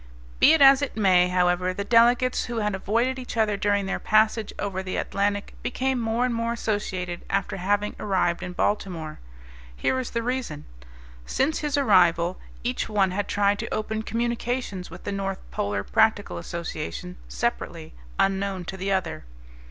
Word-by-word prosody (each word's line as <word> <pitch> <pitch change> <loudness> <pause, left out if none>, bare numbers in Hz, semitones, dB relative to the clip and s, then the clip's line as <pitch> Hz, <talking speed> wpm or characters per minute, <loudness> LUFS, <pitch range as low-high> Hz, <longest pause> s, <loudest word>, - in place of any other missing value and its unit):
Be 305 - +7
it 320 -3 +5
as 270 0 +8
it 280 -6 -3
may, 185 -4 +5
however, 180 0 +1
the 200 - -2
delegates 240 +3 +4
who 240 -1 -4
had 210 -2 0
avoided 230 +7 0
each 250 -2 -7
other 215 -2 +2
during 200 0 +1
their 195 - -2
passage 215 0 +2
over 195 -2 -3
the 185 -1 -4
Atlantic 200 0 -1
became 260 0 -1
more 230 +2 0
and 250 - -1
more 230 0 -1
associated 190 -6 -3
after 195 0 -1
having 205 +3 0
arrived 180 -4 0
in 180 - -5
Baltimore. 175 -6 -2 0.6
Here 260 - 0
is 255 - -4
the 230 -1 -2
reason: 240 - -3 0.6
Since 300 +4 0
his 295 -2 -1
arrival 180 -8 +3 0.2
each 245 0 -2
one 200 -3 +2
had 205 +2 -2
tried 205 0 +2
to - - -5
open 215 0 -2
communications 235 -3 -2
with 175 +2 -11
the 205 - -3
North 195 -1 -2
Polar 100 -1 -2
Practical 220 - +2
Association 90 - -5
separately, - - -3 0.2
unknown 195 -1 0
to 190 - -6
the 195 +1 -2
other. 185 - -1
205 Hz, 165 wpm, -25 LUFS, 185-230 Hz, 0.6 s, as